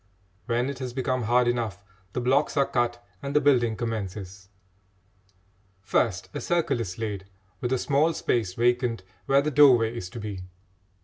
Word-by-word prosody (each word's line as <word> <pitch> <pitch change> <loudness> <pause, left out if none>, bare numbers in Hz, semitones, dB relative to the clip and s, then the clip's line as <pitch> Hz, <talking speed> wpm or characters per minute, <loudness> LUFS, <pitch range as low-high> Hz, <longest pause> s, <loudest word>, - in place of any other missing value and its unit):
When 120 +1 +1
it 140 -2 -5
has 130 -2 -5
become 130 -2 -1
hard 120 +2 +3
enough, 115 -5 -1 0.3
the - - -1
blocks 135 +5 +1
are 140 - +4
cut 120 -2 -1 0.2
and 140 +1 -5
the - - +7
building 125 -6 +3
commences. 100 -4 -5 1.3
First 95 -2 0
a - - -4
circle 170 -7 0
is 95 -5 -4
laid, 105 -4 -4 0.3
with 125 - -2
a 130 - +3
small 145 +5 +2
space 110 -11 -1
vacant 120 -3 +1 0.2
where 140 +1 +4
the 150 - -1
doorway 125 -6 +5
is 90 -6 -5
to 115 - -8
be. 105 -3 -5
120 Hz, 165 wpm, -26 LUFS, 110-130 Hz, 1.3 s, the